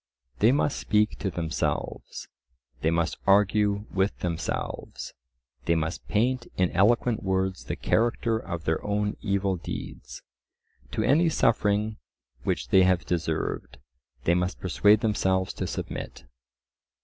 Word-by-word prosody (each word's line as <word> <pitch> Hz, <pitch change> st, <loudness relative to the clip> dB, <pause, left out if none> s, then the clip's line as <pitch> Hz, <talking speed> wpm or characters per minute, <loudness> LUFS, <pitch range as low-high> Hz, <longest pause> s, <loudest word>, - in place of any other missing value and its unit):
They 110 Hz, +3 st, +6 dB
must 145 Hz, +1 st, +1 dB
speak 105 Hz, 0 st, +1 dB
to 95 Hz, -, -1 dB
themselves; 80 Hz, -3 st, -3 dB, 0.5 s
they 80 Hz, -, +2 dB
must 85 Hz, 0 st, 0 dB
argue 100 Hz, +1 st, +3 dB
with 95 Hz, +1 st, +1 dB
themselves; 85 Hz, -2 st, -4 dB, 0.5 s
they 85 Hz, -, +3 dB
must 80 Hz, +1 st, -3 dB
paint 120 Hz, +3 st, +1 dB
in 90 Hz, -1 st, +2 dB
eloquent 110 Hz, +4 st, +3 dB
words 95 Hz, 0 st, -1 dB
the -, -, -3 dB
character 115 Hz, 0 st, +1 dB
of 85 Hz, -6 st, -5 dB
their 80 Hz, 0 st, -1 dB
own 105 Hz, 0 st, -1 dB
evil 100 Hz, -2 st, 0 dB
deeds. -, -, -7 dB, 0.7 s
To -, -, 0 dB
any 165 Hz, +5 st, +4 dB
suffering 105 Hz, -5 st, +1 dB, 0.4 s
which -, -, -2 dB
they 95 Hz, -, +6 dB
have 90 Hz, -1 st, +3 dB
deserved, 80 Hz, -7 st, -2 dB, 0.5 s
they 85 Hz, -, +3 dB
must 90 Hz, +1 st, -1 dB
persuade 105 Hz, +3 st, +4 dB
themselves 95 Hz, -4 st, +1 dB
to -, -, -3 dB
submit. 65 Hz, -, -5 dB
100 Hz, 125 wpm, -27 LUFS, 90-105 Hz, 0.7 s, They